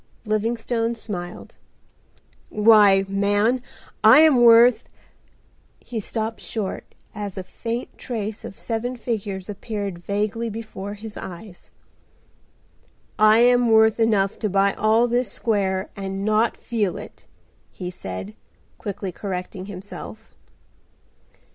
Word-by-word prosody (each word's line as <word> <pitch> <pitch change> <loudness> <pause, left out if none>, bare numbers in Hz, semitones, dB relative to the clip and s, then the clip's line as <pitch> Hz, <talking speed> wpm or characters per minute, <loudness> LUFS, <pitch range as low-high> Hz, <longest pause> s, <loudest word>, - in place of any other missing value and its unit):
Livingstone 230 +2 -1
smiled. 180 -6 -7 0.9
"Why, 210 -3 +5
man, 205 +5 +1 0.4
I 220 +8 +9
am 310 -4 +6
worth—" 235 +1 +6 0.9
He 235 - -6
stopped 220 +1 -4
short 210 -4 -5 0.2
as 205 -2 -6
a 190 - -4
faint 230 +6 -6
trace 220 -3 -5
of 195 - -9
seven 245 +2 -3
figures 205 -5 -4
appeared 200 -3 -5
vaguely 210 +5 -2
before 210 -2 -7
his 215 0 -9
eyes. 180 +1 -10 1.5
"I 215 +2 +6
am 245 0 +4
worth 220 0 +5
enough 210 -4 +2
to 215 - -1
buy 195 +1 +2
all 220 +3 +3
this 240 -2 0
square 195 -5 -1
and 195 -1 -4
not 215 +2 +2
feel 210 -6 -2
it," - - -12 0.4
he 180 -1 -6
said, 95 - -7 0.5
quickly 200 -2 -5
correcting 185 0 -6
himself. 205 +3 -9
215 Hz, 110 wpm, -23 LUFS, 195-230 Hz, 1.5 s, I